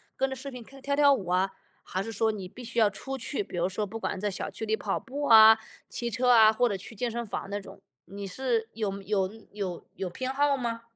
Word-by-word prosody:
跟 270 0 0
着 265 - -4
视 275 +2 -6
频 250 -3 -8
看， 270 +3 -14
跳 280 +1 0
跳 285 -1 +6
舞 195 -9 -3
啊。 185 +2 +2 0.3
还 185 - -2
是 225 +2 -5
说 220 +2 +2
你 195 -4 -6
必 245 +6 -11
须 235 0 -2
要 215 -2 +5
出 270 +7 -6
去， 250 -3 -3
比 175 - -8
如 175 +1 +2
说 205 +3 -2
不 225 +3 -7
管 190 - -2
在 205 +1 -1
小 - - -4
区 220 - -5
里 220 0 +1
跑 - - -1
步 285 +3 -5
啊、 220 -1 +9 0.3
骑 235 -1 -2
车 250 +3 +1
啊， 220 -3 +8
或 245 +2 +2
者 200 - -1
去 220 +4 -9
健 235 +3 -1
身 235 0 -3
房 200 -1 -5
那 205 0 -2
种， 195 - -13 0.2
你 200 +1 -7
是 230 +2 -1
有 200 -3 -3
有 195 -2 0 0.2
有 190 -4 -5
有 185 -1 -3
偏 260 +7 -4
好 285 0 +3
吗？ 230 -2 -3
220 Hz, 275 characters per minute, -28 LUFS, 200-250 Hz, 0.3 s, 啊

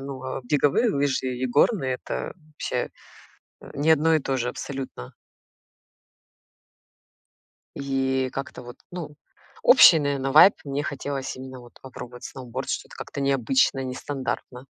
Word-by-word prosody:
но 135 -1 -6
беговые 150 - +3
лыжи 135 -2 0
и 125 - -2
горные- 135 - +2
это, - - -4
вообще, 155 -3 -4 0.7
э, - - -13
не 150 +3 +1
одно 160 +1 +4
и 155 - +3
то 135 0 -1
же 125 -1 -1
абсолютно. 130 - -6 2.6
И 135 -1 0
как-то 135 -2 -6
вот, 120 0 -11
ну, 165 -4 -7 0.5
общий, - - +8
наверное, 140 -2 -1
вайб, 170 +6 +9
мне 140 0 -2
хотелось 140 -2 -4
именно 130 0 -9
вот 120 -1 -15
попробовать 125 -1 -10
сноуборд, 125 -3 -6
что-то - - -4
как-то 140 - -7
необычно, 135 0 +2
нестандартно. 130 -1 -5
135 Hz, 125 wpm, -25 LUFS, 130-145 Hz, 2.6 s, вайб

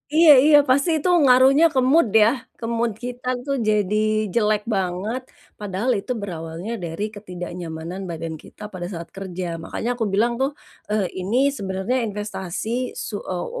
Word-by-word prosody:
Iya 325 0 +7
iya, 295 0 +7
pasti 280 +5 +3
itu 335 +5 0
ngaruhnya 265 +4 +6
ke 265 - +3
mood 325 -4 +5 0.2
ya? - - +6 0.3
Ke 230 - -5
mood 235 0 +1
kita 250 0 -6 0.2
tuh 275 - 0
jadi 210 -1 +1 0.4
jelek 215 -2 +2
banget, 195 +6 -2 0.4
padahal 205 +4 -1
itu 250 - -6
berawalnya 170 +2 -6
dari 165 +4 -4
ketidaknyamanan 175 -3 -7
badan 165 -1 -5
kita - - -16
pada 175 -1 -5
saat 170 -1 -7
kerja. 185 -2 -5 0.2
Makanya 225 +7 -4
aku 240 -2 -2
bilang 225 +4 +3
tuh, 270 - +2 0.4
eee, 210 -2 +1 0.2
ini 210 +7 -1 0.2
sebenarnya 190 +5 -2
investasi 205 -1 -5 0.4
su 210 - -5
eee, 180 -2 -4
205 Hz, 155 wpm, -22 LUFS, 180-245 Hz, 0.4 s, Iya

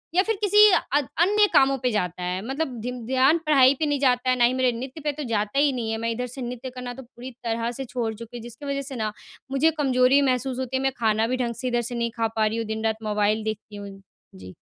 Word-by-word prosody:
या 370 - +6
फ़िर 445 0 -1
किसी 420 +1 +7 0.2
अत 290 -3 +2
अन्य 415 +4 +5
कामों 270 0 +4
पे 250 - +3
जाता 180 -3 -2
है। 180 +1 -2
मतलब 270 -3 -3
धिन 245 -1 -5
ध्यान 265 +5 +3
पढ़ाई 275 -3 +6
पे 310 - +1
नहीं 290 -2 0
जाता 255 -2 +2
है 255 - +3
ना 240 - +5
ही 245 - +2
मेरे 255 -1 +2
नृत्य 265 +5 -7
पे 295 - 0
तो 295 +1 -6
जाता 210 +4 0
ही 290 -1 +4
नहीं 230 -3 -3
है। 225 - -1
मैं 230 +1 -2
इधर 250 +2 -3
से 255 +2 -9
नृत्य 250 +1 -5
करना 250 -1 -7
तो 265 +1 -10
पूरी 245 +2 -11
तरह 230 0 -1
से 265 +2 -6
छोड़ 235 -2 -3
चुकी 230 +2 -9
हूँ - - -8
जिसकी 240 +4 -10
वजह 280 0 -2
से 270 0 -7
ना, 215 -3 -2 0.4
मुझे 285 +4 +3
कमज़ोरी 260 0 +4
महसूस 260 -1 0
होती 260 0 -2
है 265 - -3
मैं 270 - +2
खाना 220 0 +2
भी 255 +2 -1
ढंग 235 -2 -2
से 255 - -2
इधर 240 -1 +1
से 245 - -4
नहीं 235 -1 -1
खा 225 -1 +1
पा 220 -1 +2
रही 220 +2 -1
हूँ, 230 - -2
दिन-रात 220 0 -1
मोबाइल 210 0 0
देखती 215 -1 -5
हूँ। 200 -1 -9 0.3
जी। 95 0 -11
250 Hz, 265 wpm, -24 LUFS, 225-270 Hz, 0.4 s, किसी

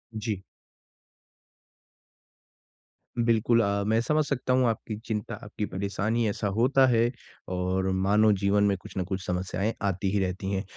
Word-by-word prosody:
जी। 105 -3 -3 2.8
बिल्कुल। 115 0 +3
अ, 100 -1 0
मैं 110 +1 +3
समझ 155 +5 +2
सकता 130 -2 -1
हूँ 130 -1 +3
आपकी 110 0 -3
चिंता, 105 -2 -3
आपकी 105 0 -4
परेशानी 105 +4 -1
ऐसा 105 0 -2
होता 130 +3 +4
है 120 -1 +3 0.4
और 95 +1 0
मानव 100 +3 +3
जीवन 100 +1 +3
में 100 -1 +3
कुछ - - -13
ना 95 - +1
कुछ 95 +1 -4
समस्याएँ 95 +4 -1
आती 95 -1 0
ही 100 - +1
रहती 95 +1 -2
हैं। 95 0 -1
105 Hz, 145 wpm, -27 LUFS, 95-115 Hz, 2.8 s, होता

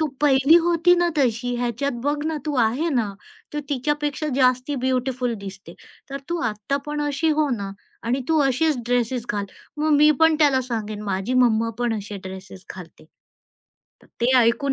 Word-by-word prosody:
तू 315 - +2
पहिली 280 +2 +5
होती 345 +1 +4
ना 350 0 +2
तशी 245 -3 0
ह्याच्यात 245 +3 -2
बघ 290 +1 0
ना 320 -1 -1
तू 295 - -1
आहे 255 +10 0
ना. 240 -9 0 0.4
तर 295 - -2
तिच्यापेक्षा 295 +2 -1
जास्ती 255 +2 +2
ब्युटीफुल 255 -2 -1
दिसते. 195 -1 -9 0.4
तर 275 - -4
तू 345 - -1
आत्ता 210 +6 -3
पण 295 0 -3
अशी 290 +3 0
हो 305 -1 +2
ना 200 -1 -5 0.4
आणि 255 +3 0
तू 320 - +3
अशीच 285 +3 +1
ड्रेसेस 245 0 0
घाल. 205 -1 -2 0.3
मग 310 +1 +1
मी 300 +1 +6
पण 320 -1 +5
त्याला 285 -4 +4
सांगेन, 215 -2 -4
माझी 195 +4 -2
मम्मा 230 -1 +2
पण 240 -2 0
असे 205 0 -7
ड्रेसेस 190 0 -10
घालते. 175 -4 -12 1.0
तर - - -20
ते 240 +2 +2
ऐकून 240 +4 +2
255 Hz, 170 wpm, -23 LUFS, 225-295 Hz, 1.0 s, मी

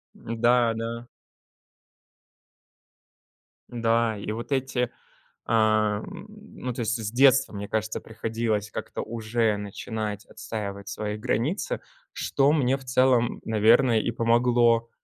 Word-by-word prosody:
М-да, 120 0 +2
да. 115 +1 -4 2.6
Да. 115 -2 +1
И 105 +1 -5
вот 115 +5 -6
эти, 130 -2 0 0.6
а, 110 -2 +2
м, 205 - -9
ну, 210 - -8
то 120 - -4
есть, 115 +2 0
с 110 -1 -4
детства, 135 -1 +4
мне 100 0 -5
кажется, 110 0 -2
приходилось 110 -1 -2
как-то - - -5
уже 115 -1 -1
начинать 105 +1 -5
отстаивать 100 -2 -6
свои 105 +1 -4
границы, 145 - -1 0.3
что 140 +1 +2
мне 135 -3 +2
в 135 - -14
целом, 125 -2 +2
наверное, 115 +2 +4
и 115 - -1
помогло. 115 0 +3
115 Hz, 115 wpm, -26 LUFS, 110-125 Hz, 2.6 s, детства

